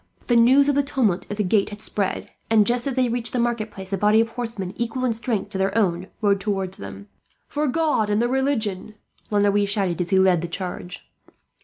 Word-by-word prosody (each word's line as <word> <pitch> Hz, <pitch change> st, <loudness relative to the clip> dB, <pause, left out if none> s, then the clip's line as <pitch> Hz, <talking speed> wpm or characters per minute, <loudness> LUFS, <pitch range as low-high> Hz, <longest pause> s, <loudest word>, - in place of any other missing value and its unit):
The 240 Hz, -, +2 dB
news 260 Hz, +4 st, +6 dB
of 290 Hz, -, +3 dB
the 285 Hz, -, +3 dB
tumult 255 Hz, -10 st, 0 dB
at 205 Hz, -, -4 dB
the 210 Hz, -, +1 dB
gate 200 Hz, +1 st, +2 dB
had 205 Hz, 0 st, -9 dB
spread 200 Hz, -2 st, -2 dB, 0.2 s
and, 220 Hz, -2 st, +5 dB
just 240 Hz, +3 st, 0 dB
as 270 Hz, -, -2 dB
they 255 Hz, -1 st, +2 dB
reached 235 Hz, 0 st, -2 dB
the 250 Hz, -, 0 dB
marketplace, 215 Hz, -5 st, -3 dB
a 195 Hz, -, 0 dB
body 210 Hz, +2 st, +4 dB
of 225 Hz, 0 st, +2 dB
horsemen, 225 Hz, -6 st, -4 dB
equal 235 Hz, +2 st, -2 dB
in 240 Hz, -, +1 dB
strength 220 Hz, -3 st, -3 dB
to 190 Hz, -, -4 dB
their 195 Hz, +3 st, 0 dB
own, 185 Hz, -4 st, +1 dB, 0.2 s
rode 200 Hz, -1 st, +3 dB
towards 195 Hz, -2 st, -3 dB
them. 100 Hz, 0 st, -9 dB, 0.4 s
"For 295 Hz, +1 st, -1 dB
God 285 Hz, -7 st, +1 dB
and 205 Hz, 0 st, +2 dB
the 240 Hz, -, +2 dB
religion!" 230 Hz, -7 st, -1 dB, 0.3 s
La 210 Hz, -, 0 dB
Noue 205 Hz, 0 st, +3 dB
shouted, 195 Hz, -4 st, -1 dB
as 175 Hz, -, -3 dB
he 190 Hz, -, +3 dB
led 185 Hz, -3 st, +4 dB
the 175 Hz, -, -3 dB
charge. 180 Hz, +1 st, -6 dB
210 Hz, 220 wpm, -23 LUFS, 190-240 Hz, 0.4 s, news